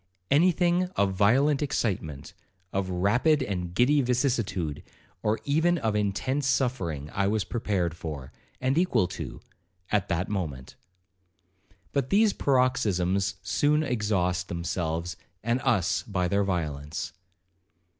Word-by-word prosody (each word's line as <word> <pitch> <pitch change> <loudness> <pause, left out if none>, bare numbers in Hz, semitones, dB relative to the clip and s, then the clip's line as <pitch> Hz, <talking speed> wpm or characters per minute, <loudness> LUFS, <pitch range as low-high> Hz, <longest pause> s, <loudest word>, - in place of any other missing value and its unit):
Any 170 +6 +6
thing 175 +1 +2
of 100 -1 +2
violent 135 +9 +3
excitement, 85 - -2 0.4
of 95 -1 -1
rapid 120 - +2
and 90 -7 -3
giddy 130 +10 +3
vicissitude, 120 - 0 0.4
or 110 +1 +1
even 160 +4 +2
of 110 -8 -1
intense 130 +7 0
suffering, 90 - -1
I 100 0 +1
was 105 0 +1
prepared 90 -5 -1
for, 75 -6 -6 0.3
and 130 +5 +1
equal 175 - +2
to, - - -7 0.5
at 105 -2 +1
that 90 +1 0
moment. 80 -11 -4 1.2
But 135 -2 -1
these 210 +1 +4
paroxysms 100 -8 +1
soon 150 +1 +2
exhaust 100 - 0
themselves 85 0 -3 0.3
and 120 +3 0
us 95 -6 +2
by 90 -4 -1
their 100 +3 +2
violence. 75 -6 -3
100 Hz, 120 wpm, -27 LUFS, 90-130 Hz, 1.2 s, Any